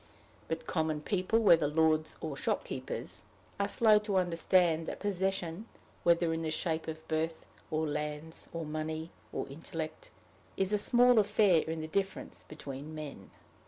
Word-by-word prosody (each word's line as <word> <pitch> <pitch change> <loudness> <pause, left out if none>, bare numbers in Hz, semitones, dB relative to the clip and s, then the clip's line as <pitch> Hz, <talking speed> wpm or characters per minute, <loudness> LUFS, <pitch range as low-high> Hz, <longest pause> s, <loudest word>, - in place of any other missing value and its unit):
But 160 - -3
common 155 -2 0
people, 190 +5 +1
whether 170 -9 +6
lords 155 +1 +2
or 155 -3 -3
shopkeepers, - - -3 0.4
are 200 - +2
slow 215 0 +5
to 210 -2 -1
understand 170 -2 +2
that - - -4
possession, 190 -1 -2 0.3
whether 170 -1 +3
in 165 - -2
the 160 - -1
shape 160 0 -1
of 160 0 -6
birth, 160 +1 -1 0.2
or 155 0 0
lands, 150 +2 -3
or 165 -1 -4
money, 155 +1 -4 0.2
or - - -3
intellect, 160 - -6 0.5
is 195 +1 +1
a 210 - +3
small 245 +2 +5
affair 205 -5 +4
in 160 0 -3
the 155 - -4
difference 195 +4 -3
between 145 0 -7
men. 145 -11 -7
165 Hz, 150 wpm, -32 LUFS, 155-190 Hz, 0.5 s, whether